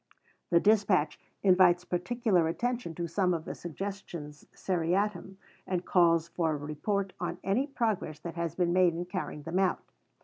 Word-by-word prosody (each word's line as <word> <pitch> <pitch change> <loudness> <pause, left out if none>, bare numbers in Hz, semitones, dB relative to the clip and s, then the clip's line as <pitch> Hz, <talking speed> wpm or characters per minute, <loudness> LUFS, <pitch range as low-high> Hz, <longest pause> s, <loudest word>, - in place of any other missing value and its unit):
The 170 - +5
dispatch 200 -6 +3 0.2
invites 180 -2 +5
particular 180 -1 +1
attention 235 0 -2
to 170 - -3
some 180 +1 +1
of 160 0 -5
the - - -4
Suggestions 170 -4 -7
seriatim, 190 +2 -1 0.3
and 180 -1 -2
calls 170 -2 +4
for 165 -2 0
a - - -2
report 185 +7 -2
on 175 0 -3
any 230 +9 +1
progress 220 - -1
that 170 - -6
has 170 -1 -3
been 175 -2 +1
made 180 -2 +4
in 175 +1 -3
carrying 180 -5 -5
them 165 +4 -1
out. 190 -1 +1
180 Hz, 160 wpm, -30 LUFS, 165-195 Hz, 0.3 s, The